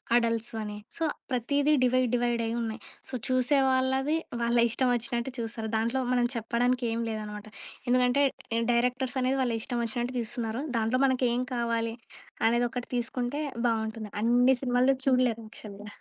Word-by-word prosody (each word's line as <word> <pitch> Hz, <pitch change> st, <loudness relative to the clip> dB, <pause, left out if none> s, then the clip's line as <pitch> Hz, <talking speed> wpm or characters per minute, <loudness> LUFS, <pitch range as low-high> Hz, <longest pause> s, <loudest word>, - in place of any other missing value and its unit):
Adults 230 Hz, -1 st, +1 dB
అని 210 Hz, -1 st, -5 dB, 0.2 s
so, 330 Hz, -, -2 dB, 0.3 s
ప్రతీదీ 280 Hz, +4 st, +2 dB
divide 255 Hz, 0 st, +3 dB
డివైడయ్యున్నాయి. 235 Hz, -2 st, -1 dB, 0.3 s
So, -, -, -11 dB
చూసే 255 Hz, +2 st, +3 dB
వాళ్ళవి 265 Hz, +3 st, +2 dB, 0.2 s
వాళ్ళ 235 Hz, +1 st, +2 dB
ఇష్టం 250 Hz, +2 st, +1 dB
ఒచ్చినట్టు 240 Hz, +1 st, -3 dB
చూస్తారు. 225 Hz, -1 st, -3 dB
దాంట్లో 235 Hz, +4 st, 0 dB
మనం 245 Hz, -1 st, +3 dB
చెప్పడానికి 240 Hz, +2 st, 0 dB
ఏం 230 Hz, -, -1 dB
లేదనమాట. 210 Hz, -1 st, -5 dB, 0.4 s
ఎందుకంటే 250 Hz, +3 st, +4 dB, 0.5 s
డైరెక్టర్స్ 250 Hz, +2 st, 0 dB
అనేది 260 Hz, +2 st, +1 dB
వాళ్ళిష్టవొచ్చినట్టు 240 Hz, +1 st, -2 dB
తీస్తున్నారు. 230 Hz, +1 st, -3 dB, 0.2 s
దాంట్లో 230 Hz, +3 st, +1 dB
మనకేం 250 Hz, -2 st, +2 dB
కావాలి 230 Hz, -1 st, 0 dB, 0.5 s
అనేది 240 Hz, +1 st, +2 dB
ఒకటి 250 Hz, -1 st, -4 dB
తీసుకుంటే 250 Hz, +2 st, -2 dB, 0.3 s
బావుంటుంది. 220 Hz, -2 st, -2 dB
అన్ని 245 Hz, +3 st, +4 dB
సినిమాలు 250 Hz, +1 st, +3 dB
చూడలేరు 250 Hz, -4 st, +2 dB
యాక్చువల్‌గ. 210 Hz, -1 st, -10 dB
240 Hz, 125 wpm, -28 LUFS, 230-255 Hz, 0.5 s, ఎందుకంటే